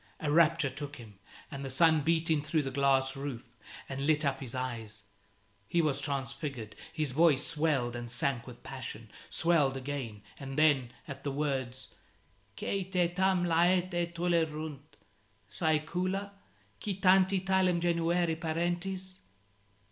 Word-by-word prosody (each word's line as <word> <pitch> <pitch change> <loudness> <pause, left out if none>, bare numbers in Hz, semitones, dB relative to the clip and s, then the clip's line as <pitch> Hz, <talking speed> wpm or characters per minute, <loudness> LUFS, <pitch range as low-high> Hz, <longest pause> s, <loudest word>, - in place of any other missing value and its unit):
A 150 - -1
rapture 165 -2 +4
took 145 +2 -7
him, 105 -6 -13 0.3
and 140 0 -5
the 135 - -4
sun 160 +3 +4
beat 165 +2 +1
in 155 -2 +3
through 155 +1 0
the 135 - -3
glass 135 0 +2
roof, 135 -4 -5 0.4
and 135 +1 -3
lit 155 0 +3
up 135 -1 0
his 130 -2 -6
eyes. 115 -4 -4 0.6
He 170 - +1
was 145 -4 +1
transfigured; 135 -4 -4 0.2
his 155 -4 -1
voice 150 -1 +4
swelled 145 -6 +1
and 120 0 -5
sank 120 0 -1
with 125 -1 -11
passion, 115 -4 -7 0.2
swelled 150 -6 +2
again, 130 -6 -5 0.2
and 135 0 -6
then, 145 -6 +4 0.2
at 140 -2 -8
the 145 - -1
words 135 -3 -3 0.6
"Quae 195 -1 -1
te 180 -2 +1
tam 185 0 +2
laeta 175 +1 +2
tulerunt 160 -4 -2 0.5
Saecula? 180 +6 0 0.5
Qui 200 -2 -1
tanti 190 0 +5
talem 190 -2 +2
genuere 170 0 +1
parentes?" 175 +3 -2
150 Hz, 140 wpm, -31 LUFS, 135-170 Hz, 0.6 s, tanti